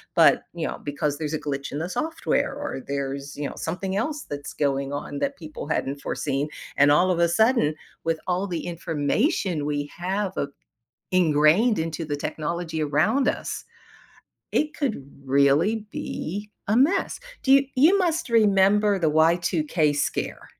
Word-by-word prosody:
but, - - +5
you - - -3
know, - - -5
because 145 0 -2
there's 155 -1 -3
a 155 - -1
glitch 140 -1 -4
in 145 - -3
the 175 +3 -3
software, 320 - -1
or 280 - -5
there's, 140 0 -4
you 145 -1 -3
know, - - -9
something 190 +3 -3
else 295 +8 -2
that's 145 0 -6
going 140 -1 -1
on 145 0 -4
that 280 0 -2
people 155 -3 -8
hadn't 140 -2 -2
foreseen, 145 +1 -2 0.3
and 145 +1 +6
all 180 +5 +4
of 170 - 0
a 170 - +5
sudden, 220 - +3 0.3
with 165 -1 0
all 185 +2 0
the 175 -4 -4
information 170 - 0
we 145 -1 -2
have, 190 +2 -2
uh, 140 - 0 0.6
ingrained 175 +5 +4
into 165 0 -3
the 145 -1 -2
technology 160 +2 -3
around 155 - +2
us, - - -2 0.9
it 300 0 +1
could 230 - -2 0.2
really 145 +11 +3
be 205 +6 -5 0.2
a 215 - +3
mess. 350 - +2 0.2
Do 265 - +3
you 275 0 +6
you 335 +9 +6
must 340 -3 0
remember 205 -2 +4
the 160 -3 +2
Y2K 160 -1 +2
scare. - - -2
165 Hz, 160 wpm, -25 LUFS, 145-210 Hz, 0.9 s, and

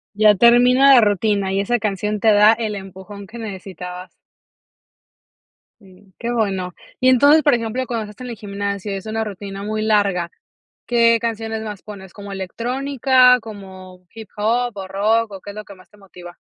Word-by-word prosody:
Ya 210 0 +5
termina 245 +5 +5
la 250 - +7
rutina 205 -2 0
y 195 - +1
esa 240 +4 0
canción 210 0 -2
te 220 0 +4
da 210 +1 +6
el 220 -2 -3
empujón 195 +1 -10
que 235 +4 -11
necesitabas. 185 -4 -8 1.7
Sí. 190 0 -20
Qué 240 0 -4
bueno. 190 -6 -2 0.3
Y, 255 - +3
entonces, 285 +5 +5
por 290 -4 +4
ejemplo, 235 +2 -2
cuando 230 -3 -3
estás 250 +5 -11
en 245 - -7
el 230 - -7
gimnasio 200 0 -5
y - - -3
es 195 +2 -9
una 220 0 -2
rutina 200 -1 -8
muy 215 +1 -3
larga, 200 -5 +1 0.6
¿qué 230 -1 +3
canciones 225 -1 -4
más 210 -3 -7
pones? 190 -3 -11
¿Como 200 -1 -10
electrónica, 250 +5 +2
como 190 -4 -12
hip 225 -2 -11
hop 235 +1 -1
o 190 -1 -6
rock, 215 +3 0
o 190 - -9
qué 205 - -9
es 200 - -14
lo 215 - -7
que 200 - -12
más 185 - -20
te 210 - -22
motiva? 180 -3 -13
210 Hz, 180 wpm, -19 LUFS, 195-230 Hz, 1.7 s, la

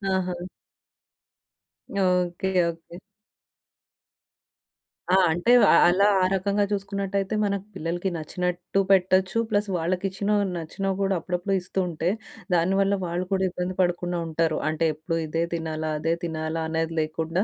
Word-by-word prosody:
ఆహా! 185 -1 -1 1.7
Okay. 180 0 0 0.2
Okay. 170 +1 -9 2.1
ఆ! - - +7 0.2
అంటే‌ 175 +8 +1 0.2
అ - - +6
అలా 195 +3 +4
ఆ - - +4
రకంగా 200 +2 +1
చూసుకున్నట్టయితే 200 0 -2
మన‌కు 200 -1 -1
పిల్లలకి 175 +4 -2
నచ్చినట్టు 180 +4 -2
పెట్టొచ్చు, 190 +1 +3
ప్లస్ 205 -1 0
వాళ్ళకి 180 +3 -1
ఇచ్చిన‌వి 205 +2 0
నచ్చినవి 190 +4 -3
కూడా 195 0 +1
అప్పుడప్పుడు 180 +3 -2
ఇస్తూ 180 +2 -4
ఉంటే, 165 +1 -1 0.5
దానివల్ల 195 +3 +2
వాళ్ళు 175 +2 -2
కూడా 190 0 +2
ఇబ్బంది 180 +1 -4
పడకుండా 175 0 0
ఉంటారు. 160 -1 0
అంటే 155 +1 0
ఎప్పుడు 165 +2 -3
ఇదే 165 +2 -1
తినాలా? 160 -1 -3
అదే 165 +2 +1
తినాలా? 160 0 -3
అనేది 165 0 -1
లేకుండా, 160 +4 -1
180 Hz, 125 wpm, -25 LUFS, 165-195 Hz, 2.1 s, ఆ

